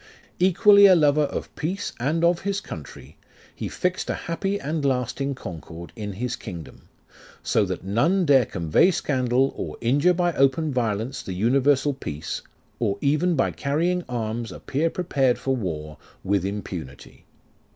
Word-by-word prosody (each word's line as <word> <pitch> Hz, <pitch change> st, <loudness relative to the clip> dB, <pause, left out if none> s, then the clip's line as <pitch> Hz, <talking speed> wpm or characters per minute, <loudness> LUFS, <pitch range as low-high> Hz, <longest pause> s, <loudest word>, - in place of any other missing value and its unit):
Equally 200 Hz, +3 st, +7 dB
a 185 Hz, -, +7 dB
lover 150 Hz, -2 st, +4 dB
of -, -, -5 dB
peace 185 Hz, +6 st, -3 dB
and 155 Hz, +7 st, 0 dB
of 170 Hz, 0 st, +3 dB
his 200 Hz, 0 st, -1 dB
country; -, -, -10 dB, 0.4 s
He -, -, -5 dB
fix'd 180 Hz, 0 st, -2 dB
a -, -, 0 dB
happy 195 Hz, +4 st, -2 dB
and 150 Hz, +2 st, -3 dB
lasting 135 Hz, +1 st, -1 dB
concord 85 Hz, -5 st, -9 dB
In 105 Hz, -3 st, -5 dB
his 120 Hz, +5 st, -3 dB
kingdom, 85 Hz, -7 st, -10 dB, 0.5 s
So 105 Hz, -, +2 dB
that 95 Hz, -2 st, -4 dB
none 145 Hz, -, +2 dB
dare 135 Hz, -5 st, +5 dB
convey 85 Hz, -, +3 dB
scandal, 130 Hz, -5 st, +1 dB
or -, -, -5 dB
injure 145 Hz, +9 st, +3 dB
by 175 Hz, -1 st, +1 dB
open 135 Hz, +2 st, +2 dB
violence 115 Hz, +1 st, -1 dB
the 95 Hz, -, -6 dB
universal 135 Hz, +7 st, +2 dB
peace, 80 Hz, -, -5 dB, 0.4 s
Or 100 Hz, -, 0 dB
even 155 Hz, +5 st, +2 dB
by 135 Hz, -, +1 dB
carrying 170 Hz, +6 st, 0 dB
arms 115 Hz, -1 st, -3 dB
appear 155 Hz, +5 st, -1 dB
prepared 140 Hz, -8 st, +1 dB
for 135 Hz, 0 st, -1 dB
war, 75 Hz, -9 st, -5 dB, 0.3 s
With 100 Hz, 0 st, +1 dB
impunity. 95 Hz, -8 st, -7 dB
135 Hz, 150 wpm, -24 LUFS, 110-165 Hz, 0.5 s, Equally